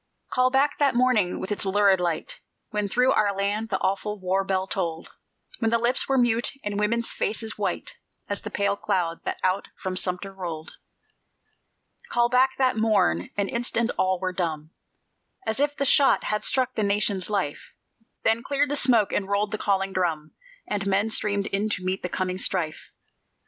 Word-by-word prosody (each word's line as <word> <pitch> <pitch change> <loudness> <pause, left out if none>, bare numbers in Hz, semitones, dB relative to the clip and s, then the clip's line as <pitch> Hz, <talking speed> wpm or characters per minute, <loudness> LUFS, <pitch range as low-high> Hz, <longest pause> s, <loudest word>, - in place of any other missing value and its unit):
Call 255 0 +3
back 275 +2 +1
that 280 -4 +3
morning, 240 -7 +2
with 190 - -5
its 205 - 0
lurid 195 -1 +3
light, 170 -3 -3 0.3
When 210 -1 -1
through 250 +5 +3
our 205 -2 +2
land 205 +3 -1
the 190 - 0
awful 210 +2 -1
war 190 +1 0
bell 190 -1 0
tolled; 165 -3 -3 0.5
When 225 - +1
lips 235 +4 +1
were 270 - +3
mute, 240 +1 +2
and 205 0 -2
women's 230 +3 0
faces 220 0 -2
white - - -3 0.3
As 205 - -3
the 215 - -6
pale 200 -1 0
cloud 170 -4 -1
that - - -2
out 185 +1 +1
from 185 -1 -4
Sumter 185 +1 -1
rolled. 170 -4 -6 1.3
Call 240 0 +2
back 260 +2 +3
that 255 -3 +2
morn: 210 - +2
an 200 -1 +1
instant 235 0 0
all 185 0 +1
were 185 0 -2
dumb, 160 -4 -3 0.7
As 220 - -2
if 290 0 +1
the 280 - -1
shot 275 0 +4
had 210 0 -1
struck 255 -1 +1
the 220 - -2
Nation's 200 -2 +2
life; 190 -9 -3 0.5
Then 225 +1 +2
cleared 280 +2 0
the 290 - 0
smoke, 240 -7 +3
and 195 -1 -1
rolled 200 +1 0
the 215 - -3
calling 195 -1 0
drum, 160 -5 -1 0.4
And 200 -1 -2
men 200 +3 +1
streamed 205 -2 +1
in 205 +2 -1
to 185 -3 -3
meet 185 +1 -1
the 180 - -3
coming 185 0 -2
strife. 170 -5 -1
205 Hz, 180 wpm, -25 LUFS, 185-235 Hz, 1.3 s, shot